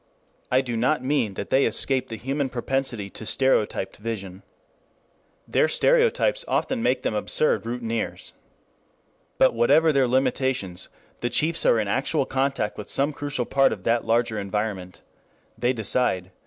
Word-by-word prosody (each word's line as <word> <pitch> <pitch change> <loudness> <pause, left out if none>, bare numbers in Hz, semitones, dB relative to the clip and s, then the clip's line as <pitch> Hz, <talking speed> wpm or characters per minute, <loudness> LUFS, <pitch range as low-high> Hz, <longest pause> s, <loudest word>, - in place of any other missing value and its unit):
I 130 +1 +4
do 120 -3 -4
not 125 +4 +1
mean 130 -7 0
that - - -6
they 135 +1 +4
escape 130 -2 -1
the 115 - -5
human 135 +4 -2
propensity 125 -3 -2
to - - -9
stereotyped 110 -5 0
vision. 100 -4 -6 1.1
Their - - +3
stereotypes - - +2
often 260 -3 0
make 130 - +1
them - - -1
absurd 110 +5 +1
routineers. 115 -1 -3 1.0
But 130 - +4
whatever 145 +8 +4
their 135 -3 +3
limitations, 125 -7 -1 0.3
the 120 - -1
chiefs 165 +6 +1
are 115 - +4
in 105 - -1
actual 135 +6 0
contact 135 -7 -1
with 105 - -7
some 140 +2 0
crucial 145 -3 -3
part 135 +2 +3
of 95 - -5
that 115 +2 +1
larger 115 -1 +1
environment. 100 -3 -4 0.5
They 125 +1 +1
decide. 110 -5 0
125 Hz, 145 wpm, -24 LUFS, 110-135 Hz, 1.1 s, I